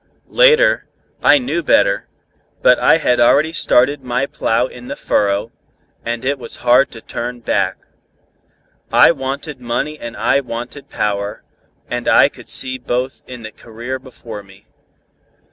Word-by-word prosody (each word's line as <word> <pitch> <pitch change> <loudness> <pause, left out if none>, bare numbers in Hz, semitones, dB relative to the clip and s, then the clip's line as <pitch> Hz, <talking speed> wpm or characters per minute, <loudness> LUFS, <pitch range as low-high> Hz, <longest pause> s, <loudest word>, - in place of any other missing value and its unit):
Later, - - +4 0.3
I - - +6
knew 250 -10 -2
better, 100 -10 +2 0.6
but - - +5
I - - +5
had 125 - +1
already 150 +7 +4
started 145 -2 +3
my 125 +2 -1
plow 115 -3 0
in 125 -1 -11
the 140 - -5
furrow, 100 +2 0 0.5
and 120 +1 -4
it 140 +1 0
was 120 - -5
hard 125 +3 +5
to 115 - -10
turn 120 +2 -6
back. 95 -4 0 1.1
I - - +6
wanted 135 -1 -5
money 135 +6 -3
and 115 -1 -8
I 115 +6 +2
wanted 125 +2 -7
power, 100 -1 -3 0.4
and - - -4
I - - +6
could - - -14
see 130 -1 0
both 125 +1 -3
in 125 -2 -9
the 110 - -7
career 120 +4 -7
before 120 -5 -10
me. 95 0 -19
125 Hz, 145 wpm, -17 LUFS, 115-140 Hz, 1.1 s, I